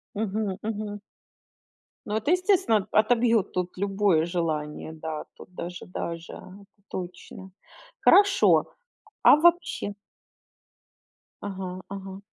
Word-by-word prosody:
Мгм 205 -2 -2
мгм. 210 -1 -4 1.1
Ну, 210 - -3
это, 220 +9 0
естественно, 365 - +2
о - - +5
отобьёт 230 -2 +2
тут 180 0 -3
любое 195 -4 +2
желание. 160 -3 -3
Да, 155 -1 -6
тут 180 - -15
даже, 175 +1 -6
даже, 170 -2 -6 0.5
точно. 185 +1 -8 0.5
Хорошо, 400 -1 +5 0.6
а - - +8
вообще 340 - +2 1.5
Ага 190 -2 -5
ага. 195 -1 -7
200 Hz, 95 wpm, -26 LUFS, 180-220 Hz, 1.5 s, а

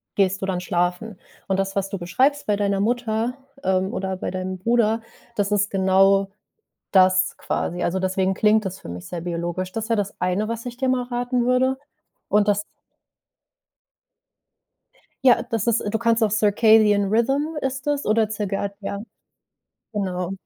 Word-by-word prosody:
gehst 195 -1 +1
du - - -1
dann 180 -2 -1
schlafen.” 180 +3 -1 0.3
Und 190 - 0
das, 195 0 -2
was 195 -1 -1
du 195 - -4
beschreibst 275 +11 +1
bei 205 -1 +2
deiner 200 -1 0
Mutter, 235 +1 0 0.3
ähm, 190 +1 +1
oder 190 -1 -3
bei - - -4
deinem 185 0 -4
Bruder, 225 +1 +2 0.3
das 205 -1 0
ist 205 0 +1
genau 195 0 +3 0.6
das 185 0 +4
quasi. 175 +1 -2
Also, 180 +2 0
deswegen 190 0 0
klingt 215 +2 +3
das 190 0 -5
für - - -11
mich 90 +1 -7
sehr 175 - -5
biologisch. 175 +1 -3
Das 225 -1 -4
wäre 230 - +3
das 205 -1 -2
eine, 185 +4 0
was 230 0 -4
ich 240 -1 -6
dir 265 0 0
mal 255 -1 +1
raten 245 0 -1
würde, 255 +1 +2 0.5
und 210 0 +3
das 205 0 +1 2.6
Ja, 250 - +6
das 225 -2 -3
ist 235 -1 +2
du 220 - 0
kannst 230 0 +2
auch 215 - +3
Circadian 210 -1 +4
Rhythm 270 +9 +1
ist 265 +1 -3
das 290 -1 0
oder 215 0 +2
zirgad 200 -2 -3
ja, 200 0 -4 0.9
genau, 185 -3 -2
205 Hz, 165 wpm, -23 LUFS, 190-230 Hz, 2.6 s, Ja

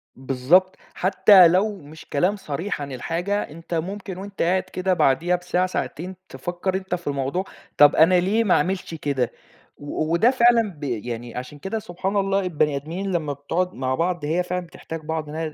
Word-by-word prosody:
بالضبط. 135 +9 +2 0.2
حتّى 185 -1 +6
لو 195 +5 +2
مش 155 +2 -13
كلام 180 +8 +1
صريح 175 -2 -4
عن 140 -1 -5
الحاجة، 175 +10 -2
أنت 165 +3 -9
ممكن 190 +3 -4
وأنت 195 +1 -7
قاعد 185 +2 +2
كده 185 0 -1
بعديها 170 +4 +2
بساعة 180 +1 0
ساعتين، 185 0 -4
تفكّر 180 +1 -3
أنت 190 -1 -2
في 170 -4 -10
الموضوع، 140 +6 -1 0.3
طب 145 0 +7
أنا 165 +4 +6
ليه 210 +6 +2
ما 195 - +3
أعملش 185 -2 0
كده. 140 -5 -1 0.5
و 155 +2 -3
وده 220 +9 +4
فعلًا 235 -4 +4
ب - - -11
يعني 120 -1 -4
عشان 130 +4 -7
كده 205 +6 -3
سبحان 190 +1 -4
الله 195 0 +2
البني 155 -6 0
آدمين 170 +8 -4
لمّا 155 -5 -1
بتقعد 170 +6 -2
مع 130 0 -1
بعض 170 -1 -1
هي 170 +4 +1
فعلًا 180 0 -3
بتحتاج 165 -1 -8
بعض 155 -1 -4
إن 155 - -7
هي 160 -1 -3
175 Hz, 180 wpm, -23 LUFS, 150-190 Hz, 0.5 s, طب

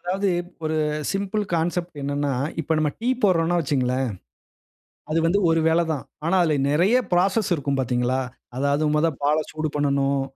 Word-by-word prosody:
அதாவது 190 +3 -1 0.4
ஒரு 155 0 -1 0.4
simple 200 +2 -1
concept 170 0 -1
என்னன்னா, 145 0 -1 0.3
இப்ப 160 +1 -1
நம்ம 150 -1 +1
டீ 240 - -1
போடுறோன்னோ 175 -3 +3
வச்சிக்ங்களேன். 130 -3 0 1.0
அது 160 - +1
வந்து 180 +5 +2
ஒரு 165 0 +3
வேல 165 +1 +3
தான். 145 - -4 0.2
ஆனா 180 +3 +2
அதில 155 -3 +2 0.2
நிறைய 180 +11 +3 0.2
ப்ராசஸ் 195 +4 +2
இருக்கும் 140 -2 -2
பாத்தீங்களா? 125 +1 0 0.4
அதாவது, 140 +2 +1
மொத 165 +2 +3
பால 150 +2 +3
சூடு 155 0 -2
பண்ணனும் 140 -1 +1
155 Hz, 150 wpm, -23 LUFS, 140-175 Hz, 1.0 s, போடுறோன்னோ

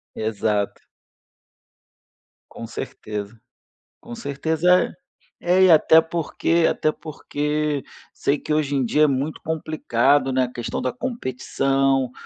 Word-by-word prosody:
Exato. 105 -1 -1 1.7
Com 115 - -7
certeza, 105 -2 -6 0.7
com - - -10
certeza. 160 +7 +1 0.5
É, 180 +2 +3
e 185 - +7
até 160 0 +7
porque 165 0 0
até 155 - 0
porque 150 -1 -3 0.3
sei 140 +1 0
que 150 - -3
hoje 145 -2 0
em 135 -2 +1
dia 150 +6 +3
é - - +6
muito 140 +3 -2
complicado, 145 -4 +1
né, 130 0 +2
a 125 - -3
questão 120 - -4
da - - -2
competição, 135 - -1
145 Hz, 120 wpm, -22 LUFS, 130-160 Hz, 1.7 s, e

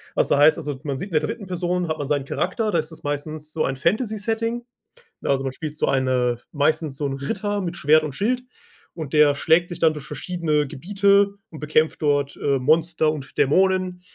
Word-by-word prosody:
Was - - +2
da - - +3
heißt 150 +4 +6
also 145 -4 -4
man 140 -3 -3
sieht 195 +7 -5
in - - -13
der - - -10
3. 200 +6 -4
Person 180 -1 -1
hat 155 0 -2
man 140 - -3
seinen 145 -2 0
Charakter, 215 +8 -1
da 170 - +2
ist 155 +1 -5
es 160 - -12
meistens 150 +1 -5
so 160 - 0
ein 135 - -2
Fantasy 215 - 0
Setting, 230 +2 -2 0.6
ne? - - -4
Also, 135 -1 +2
man 135 -1 -3
spielt 155 0 -6
so - - +1
eine 125 -2 +1
meistens 150 -1 0
so 145 - -2
'n 135 - -3
Ritter 205 +8 -2
mit 175 -1 -4
Schwert 155 +2 +4
und 150 -3 -4
Schild 245 - 0 0.5
und 155 -5 -6
der 150 -2 +5
schlägt 165 +4 +3
sich 175 - -5
dann 160 -1 +4
durch 150 -2 -8
verschiedene 155 -1 -1
Gebiete 200 +6 +2 0.2
und 155 - -9
bekämpft 155 +2 +1
dort, 145 -2 +1
äh, 140 -1 +1
Monster 160 +2 +2
und 140 -3 -8
Dämonen 185 +4 +2
155 Hz, 215 wpm, -23 LUFS, 145-180 Hz, 0.6 s, heißt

